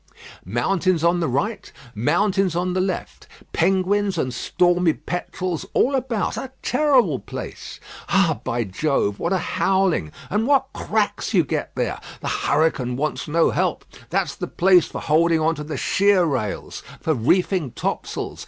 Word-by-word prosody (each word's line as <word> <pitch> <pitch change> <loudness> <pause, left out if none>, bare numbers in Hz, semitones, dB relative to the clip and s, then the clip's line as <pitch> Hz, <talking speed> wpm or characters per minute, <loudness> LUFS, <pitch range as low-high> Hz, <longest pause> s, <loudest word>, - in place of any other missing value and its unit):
Mountains 170 - +1
on 170 +1 +3
the 165 - 0
right, 200 - -2 0.2
mountains 190 - +1
on 180 +1 0
the 185 - +1
left. 185 0 -4 0.3
Penguins 195 0 +1
and 130 -5 -1
stormy 175 +5 +2
petrels 175 0 -4
all 275 - +3
about. 245 -6 -1
A 265 - -5
terrible 275 -2 +3
place. - - -8 0.3
Ah! 190 -6 +3
by 120 -2 -1
Jove, 105 0 -1
what 170 - -1
a 190 - +3
howling 185 - +1 0.2
and 215 +4 +1
what 270 -2 +3
cracks 215 0 -1
you 175 - +5
get 140 - -3
there! - - -2 0.2
The - - -4
hurricane 140 -5 +1
wants 140 0 -2
no 165 +2 +3
help. - - -1 0.2
That's - - 0
the - - -5
place 180 -1 +4
for - - -6
holding 165 +2 +3
on 160 +1 +2
to 150 - -6
the 150 +1 -5
sheer 200 -2 +3
rails; 125 -10 -3 0.2
for 160 - 0
reefing 165 - +1
topsails. - - -4
175 Hz, 155 wpm, -22 LUFS, 150-195 Hz, 0.3 s, you